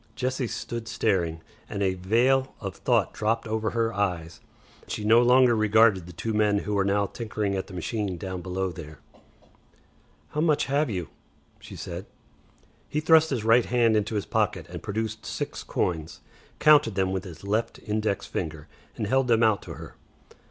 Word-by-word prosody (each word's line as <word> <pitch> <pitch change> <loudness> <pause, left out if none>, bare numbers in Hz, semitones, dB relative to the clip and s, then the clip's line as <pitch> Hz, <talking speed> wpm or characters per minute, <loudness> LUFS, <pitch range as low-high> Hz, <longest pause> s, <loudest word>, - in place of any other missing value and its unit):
Jessie 130 0 -1
stood 115 0 -5
staring, 85 -8 0 0.3
and 100 - -2
a 95 -1 +2
veil 120 +8 +2
of 100 -3 -5
thought 120 -6 +1
dropped 115 +2 -1
over 110 0 -1
her 115 0 0
eyes. 90 -5 -2 0.5
She 105 - -4
no 115 +3 +6
longer 125 0 +5
regarded 110 -4 +4
the - - -9
two 110 +7 -4
men 105 -1 +3
who 105 - -2
were 100 -1 +2
now 100 +1 +1
tinkering 105 -1 -3
at 95 - -3
the 95 - -10
machine 95 +1 -3
down 95 0 -5
below 95 +1 -2
there. 80 -3 -10 1.3
"How 150 - -2
much 155 -3 +2
have 145 +1 +1
you?" 90 -6 -4 0.5
she - - -11
said. - - -7 0.8
He 150 - -1
thrust 160 0 +5
his 125 -6 -2
right 115 +2 +5
hand 120 -2 +3
into 105 +1 0
his 105 - -1
pocket - - 0
and - - -7
produced 110 +1 -3
six - - -4
coins, 80 -3 -3 0.4
counted 145 -8 +5
them 95 -1 +1
with 95 -1 -2
his 80 -5 -11
left 105 +3 -1
index 105 -1 -1
finger, 80 -2 -5 0.3
and - - -2
held 130 +4 +2
them 115 -1 +3
out 110 -2 +3
to 80 - -8
her. 80 0 -11
105 Hz, 175 wpm, -26 LUFS, 95-115 Hz, 1.3 s, no